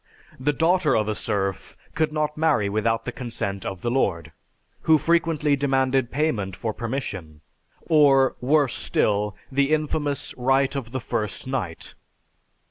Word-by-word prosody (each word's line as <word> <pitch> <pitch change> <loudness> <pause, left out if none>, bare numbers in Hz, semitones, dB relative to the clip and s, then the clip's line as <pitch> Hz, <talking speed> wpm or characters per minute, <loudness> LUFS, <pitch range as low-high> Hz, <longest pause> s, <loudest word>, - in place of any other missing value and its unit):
The 140 +3 +1
daughter 165 0 +2
of 105 -1 0
a 110 - 0
serf 100 -2 -3 0.2
could 155 -1 0
not 150 -1 -1
marry 150 -10 +2
without 115 +2 0
the - - -4
consent 100 -6 -4
of 95 -2 -6
the 120 - 0
lord, 85 - 0 0.6
who 160 - +8
frequently 155 -2 +2
demanded 135 -2 +1
payment 115 - -1
for 110 +3 -3
permission; 100 - -5 0.5
or, 140 -4 +5
worse 140 0 +2
still, 105 -1 0 0.2
the 140 +1 +2
infamous 150 -2 -1
"Right 135 +2 +2
of 125 -4 -4
the 130 - -2
First 105 -2 -3
Night." 120 -11 -4
130 Hz, 140 wpm, -24 LUFS, 105-150 Hz, 0.6 s, who